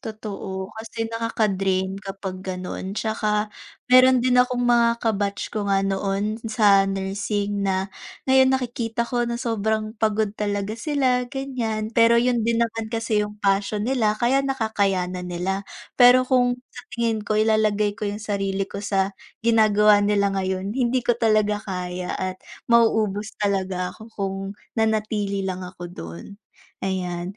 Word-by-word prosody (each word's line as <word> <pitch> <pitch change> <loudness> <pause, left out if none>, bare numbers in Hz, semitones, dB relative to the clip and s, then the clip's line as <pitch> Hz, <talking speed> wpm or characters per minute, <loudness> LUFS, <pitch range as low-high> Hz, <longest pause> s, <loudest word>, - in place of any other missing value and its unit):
totoo 200 -3 -6
kasi 225 +1 -4
nakaka-drain 195 -4 0
kapag 195 -2 -6
ganon, 185 +1 -5
tsaka 215 -1 -1 0.4
meron 255 -1 +7
din 250 -1 +3
akong 250 0 +1
mga 235 -1 +4
ka-batch 205 -2 -1
ko 210 -2 -2
nga 195 0 +2
noon 195 +3 -1
sa 200 -3 +4
nursing 200 +1 -2
na, 190 0 -1 0.3
ngayon 265 0 +5
nakikita 235 -2 -2
ko 240 0 -1
na 235 - -2
sobrang 220 -2 -1
pagod 215 -1 +1
talaga 205 0 -1
sila 255 -3 +1
ganyan. 240 -6 -3
Pero 230 0 +5
yun 240 0 +2
din 235 0 +2
naman 225 -1 -5
kasi 225 -2 0
yung 210 0 -4
passion 200 +1 +1
nila, 230 -5 +1
kaya 250 +4 +2
nakakay 220 -7 0 0.2
na 180 - -5
nila. 180 +2 -3 0.3
Pero 250 +1 +8
kung 250 -1 +2 0.2
sa 245 - -10
tingin 230 -2 0
ko, 215 - 0
ilalagay 215 -1 +2
ko 210 - -2
yung 210 +1 -5
sarili 195 -2 -1
ko 200 - -5
sa 195 -1 0 0.3
ginagawa 210 -2 +5
nila 205 -1 +2
ngayon, 190 +1 -2
hindi 250 0 +1
ko 240 - +4
talaga 215 -2 +2
kaya 180 -2 -4
at 185 0 -4 0.3
mauubos 220 -3 +2
talaga 190 -3 -1
ako - - -14
kung 195 -1 -2 0.4
nanatili 210 -3 0
lang 185 -1 -3
ako 180 -1 -9
dun, 85 - -8 0.6
ayan. 185 0 -3
210 Hz, 145 wpm, -23 LUFS, 195-230 Hz, 0.6 s, Pero